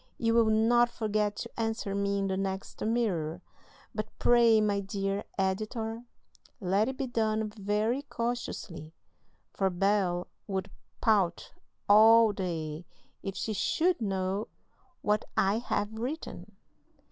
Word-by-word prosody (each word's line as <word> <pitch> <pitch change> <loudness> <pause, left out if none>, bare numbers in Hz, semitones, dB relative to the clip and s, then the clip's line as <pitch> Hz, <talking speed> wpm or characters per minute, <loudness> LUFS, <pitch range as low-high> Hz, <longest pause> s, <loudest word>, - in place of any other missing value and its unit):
You 230 -1 +1
will 230 -1 +4
not 235 +2 +4
forget 215 -3 -1
to 235 +2 -7
answer 225 -3 -2
me 200 0 0
in 195 - 0
the 190 -1 -1
next 190 0 -4
Mirror; 185 -8 -1 0.5
but - - -3
pray, 235 -2 +5
my 205 -1 +1
dear 195 0 -2
Editor, 220 +4 -2 0.5
let 200 +3 +1
it 265 - -5
be 270 - -1
done 220 -3 0
very 210 +4 0
cautiously, 230 - -4 0.6
for 195 -1 +1
Bel 185 -1 +1 0.2
would 190 -1 -3 0.3
pout 200 -7 +1 0.3
all 220 +2 +7
day 165 -4 -4 0.3
if 195 -1 -5
she 220 - -2
should 330 - +1
know 195 0 -1 0.6
what 210 0 +2
I 200 +3 +3
have 205 -3 -2
written. 250 +8 -6
210 Hz, 125 wpm, -30 LUFS, 195-225 Hz, 0.6 s, all